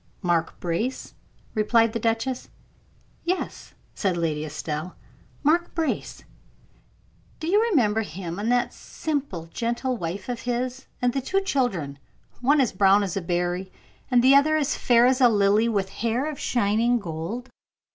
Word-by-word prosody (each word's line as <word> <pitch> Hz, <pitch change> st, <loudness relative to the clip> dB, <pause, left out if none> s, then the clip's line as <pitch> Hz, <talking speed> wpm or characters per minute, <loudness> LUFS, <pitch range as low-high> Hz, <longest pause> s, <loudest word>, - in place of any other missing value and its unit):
"Mark 170 Hz, -2 st, 0 dB
Brace?" 180 Hz, +10 st, -3 dB, 0.4 s
replied 225 Hz, +1 st, +3 dB
the 230 Hz, -, -1 dB
duchess. 230 Hz, +3 st, -1 dB, 0.7 s
"Yes," 365 Hz, +2 st, -3 dB, 0.2 s
said 190 Hz, -4 st, -1 dB
Lady 155 Hz, -3 st, -1 dB
Estelle; 155 Hz, +3 st, -5 dB, 0.5 s
"Mark 335 Hz, +4 st, +2 dB
Brace. 325 Hz, -2 st, -2 dB, 1.2 s
Do 315 Hz, -, -5 dB
you 400 Hz, +6 st, +3 dB
remember 225 Hz, -, +2 dB
him, 175 Hz, -1 st, -6 dB
and 220 Hz, +3 st, 0 dB
that 245 Hz, 0 st, +1 dB
simple, 280 Hz, -, -4 dB
gentle 240 Hz, +2 st, -1 dB
wife 185 Hz, -1 st, -5 dB
of 245 Hz, -2 st, -4 dB
his, 250 Hz, +2 st, -3 dB, 0.2 s
and 245 Hz, -1 st, +3 dB
the 270 Hz, -, -1 dB
two 390 Hz, +9 st, 0 dB
children, 215 Hz, -, -1 dB, 0.4 s
one 285 Hz, +4 st, +3 dB
as 255 Hz, -5 st, +2 dB
brown 195 Hz, +2 st, +5 dB
as 190 Hz, -4 st, -3 dB
a 195 Hz, -, -1 dB
berry, 175 Hz, +2 st, -2 dB, 0.4 s
and 245 Hz, -2 st, +4 dB
the 265 Hz, +2 st, +7 dB
other 290 Hz, +3 st, +5 dB
as 295 Hz, -2 st, 0 dB
fair 240 Hz, -1 st, +4 dB
as 260 Hz, +1 st, +3 dB
a 245 Hz, -, +7 dB
lily, 210 Hz, +1 st, +3 dB
with 200 Hz, -4 st, 0 dB
hair 230 Hz, +6 st, -1 dB
of 305 Hz, -3 st, -4 dB
shining 235 Hz, +1 st, +2 dB
gold?" 200 Hz, +6 st, -5 dB
230 Hz, 150 wpm, -25 LUFS, 185-260 Hz, 1.2 s, the